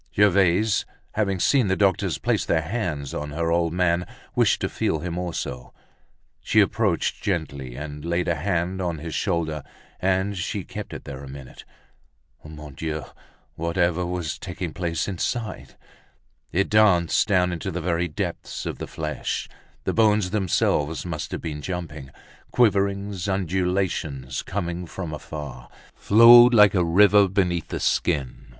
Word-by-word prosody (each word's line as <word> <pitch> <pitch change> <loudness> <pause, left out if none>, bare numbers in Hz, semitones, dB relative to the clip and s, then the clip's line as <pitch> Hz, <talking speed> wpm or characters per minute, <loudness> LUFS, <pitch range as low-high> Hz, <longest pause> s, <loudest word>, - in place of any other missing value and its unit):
Gervaise 100 +1 +3 0.3
having 100 -3 -1
seen 130 +2 +3
the 95 - +2
doctors 95 -3 +1
place - - 0
their 80 -1 +1
hands 85 - -3
on 75 - -4
her 80 +3 -1
old 85 -1 +1
man, 90 0 +1 0.3
wished - - +3
to - - 0
feel - - -1
him 85 +2 -4
also. 80 -8 -5 0.6
She - - +2
approached - - +1
gently 70 -9 -3
and 75 +1 -7
laid 85 +1 -1
a 85 - +2
hand 90 +2 -1
on 85 -3 -2
his 80 +1 -6
shoulder, 80 -5 -1 0.4
and 95 +2 0
she 90 - -3
kept - - -7
it - - -7
there 70 -1 -8
a - - -9
minute. 65 -2 -11 0.8
Mon 75 -2 -10
Dieu! 80 +2 -4 0.5
whatever 85 +1 0
was 90 -3 -3
taking 90 -3 -5
place 85 -2 -2
inside? 110 +4 -4 0.8
It 95 +4 0
danced 100 -5 +4
down 90 -3 +2
into 85 - -4
the 90 - -3
very 85 0 0
depths 75 - -5
of - - -4
the - - -5
flesh, 75 -1 -4 0.4
the - - -1
bones 105 -4 +3
themselves 85 -6 0
must 85 -3 -4
have - - -4
been 75 -3 -5
jumping. 80 -6 -6 0.4
Quiverings, 100 -4 +1
undulations, 90 -7 -1
coming 90 -2 -4
from 85 -2 -6
afar, 70 -4 -8 0.2
flowed 120 +3 +8
like 105 -3 +7
a 90 -3 +2
river 100 +4 +5
beneath 90 -3 0
the - - -4
skin. 65 -1 -1
85 Hz, 145 wpm, -24 LUFS, 80-95 Hz, 0.8 s, flowed